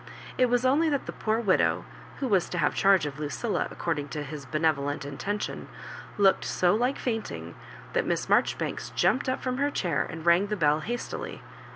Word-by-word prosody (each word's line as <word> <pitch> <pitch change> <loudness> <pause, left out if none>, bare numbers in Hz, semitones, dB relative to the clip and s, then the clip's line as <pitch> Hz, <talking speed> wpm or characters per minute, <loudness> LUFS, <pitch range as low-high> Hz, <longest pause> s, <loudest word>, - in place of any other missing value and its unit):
It 255 - +4
was 245 +1 +1
only 300 +5 +4
that 285 -2 -1
the - - -5
poor 220 +1 -1
widow 200 -5 +2 0.3
who 270 - -2
was 195 -6 +2
to 180 - -3
have 160 - +2
charge 195 -5 +4
of 145 0 -5
Lucilla, 155 +9 -1
according 150 -4 -2
to 150 0 -4
his 145 -1 -8
benevolent 145 -2 0
intention, 200 +9 -4 0.5
looked 195 -2 +4
so 180 -1 +2
like 245 +5 +1
fainting, 225 -3 -4 0.4
that - - +1
Miss - - 0
MarjoBibanks - - 0
jumped 260 0 +2
up 255 - -2
from 255 -1 -1
her 285 +1 +2
chair 180 -11 0
and 160 0 -7
rang 170 +4 +5
the 210 0 -2
bell 150 -2 +3
hastily. 240 +8 -5
195 Hz, 185 wpm, -27 LUFS, 155-240 Hz, 0.5 s, rang